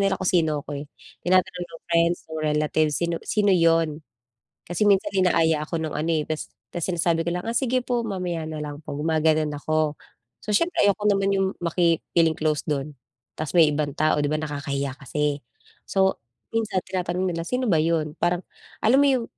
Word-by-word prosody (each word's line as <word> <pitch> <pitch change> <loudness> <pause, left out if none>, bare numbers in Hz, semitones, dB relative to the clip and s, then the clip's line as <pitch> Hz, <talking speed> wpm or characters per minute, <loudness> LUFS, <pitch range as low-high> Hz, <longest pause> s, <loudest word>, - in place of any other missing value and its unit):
nila 195 -1 +2
kung - - -2
sino 160 -4 +2
'ko 145 - -7
eh, 140 - -5 0.4
tinatanong 180 0 +2
ng 165 -1 -13
friends, 170 +1 +3
nung 160 -1 -5
relatives, 150 0 +1
sino 170 -1 0
sino 205 -2 +2
'yon? 165 -2 +2 0.7
Kasi 175 +4 -2
minsan 195 -2 +3
inaaya 165 -5 +3
ako 165 - -3
nung 155 - -4
ano 155 +3 -1
eh, 155 - +1
ta's, 155 -1 -3 0.3
ta's 175 - -3
sinasabi 170 -2 +1
ko 170 - +1
lang 180 - -3
ah, 230 - -2
sige 255 0 +1
po 245 -1 -1
mamaya 180 -5 -3
na 155 -1 -5
lang 145 -1 -6
po, - - -9
gumaganun 155 0 +1
ako. 155 +1 0 0.5
So - - -5
siyempre 340 - +2
ayoko 200 +1 +2
naman 195 0 +2
yung 195 0 +2 0.2
maki-feeling 170 -1 +2
close 155 -1 0
dun 145 -1 -2 0.4
ta's 155 +2 -4
may 160 - +8
ibang 145 -1 -1
tao, 155 -1 +2
'di - - +1
ba, - - 0
nakakahiya 140 -3 -3
kasi. 145 0 -2 0.4
So, 190 -1 +2 0.4
minsan 215 -5 0
tinatanong 185 -1 -2
nila 165 0 -3
sino 250 +1 0
ba 160 - +4
yun? 160 -2 0
Parang 175 +1 +1 0.4
alam 250 +5 +5
mo 285 - +5
yung 260 -4 +2
165 Hz, 190 wpm, -24 LUFS, 155-185 Hz, 0.7 s, may